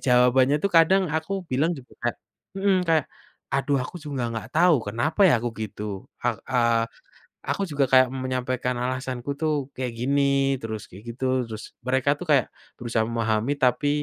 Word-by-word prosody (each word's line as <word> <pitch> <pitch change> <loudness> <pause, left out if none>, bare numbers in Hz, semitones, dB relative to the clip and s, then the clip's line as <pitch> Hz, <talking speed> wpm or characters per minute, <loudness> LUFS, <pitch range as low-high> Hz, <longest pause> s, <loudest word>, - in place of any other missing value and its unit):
Jawabannya 125 +3 +4
itu 200 - +2
kadang 190 +4 +5
aku 180 +4 -2
bilang 145 +6 +2
juga 130 -3 -13
kayak, 120 - -1 0.4
mhm, 195 0 +2
kayak, 160 -3 +3 0.5
aduh 140 +1 +1
aku 130 - -9
juga 140 -5 -4
nggak 115 -1 -5
tahu 175 0 +6
kenapa 120 - -2
ya 165 - +5
aku 120 - 0
gitu 105 0 -5 0.4
a - - +2 0.2
a 130 - 0 0.9
aku 200 - 0
juga 145 -1 +2
kayak 130 0 +7 0.2
menyampaikan 130 0 -1
alasanku 130 0 -3
ituh 155 0 0 0.2
kayak 125 -2 -3
gini 140 +3 +1 0.4
terus 110 -2 -5
kayak 95 +3 -13
gitu 130 +3 -6 0.2
terus 110 0 -7 0.2
mereka 130 +2 +2
tuh 180 - -6
kayak, 140 -3 +4 0.3
berusaha 115 -2 0
memahami 115 +2 0
tapi 130 +3 +2
130 Hz, 165 wpm, -25 LUFS, 120-150 Hz, 0.9 s, kayak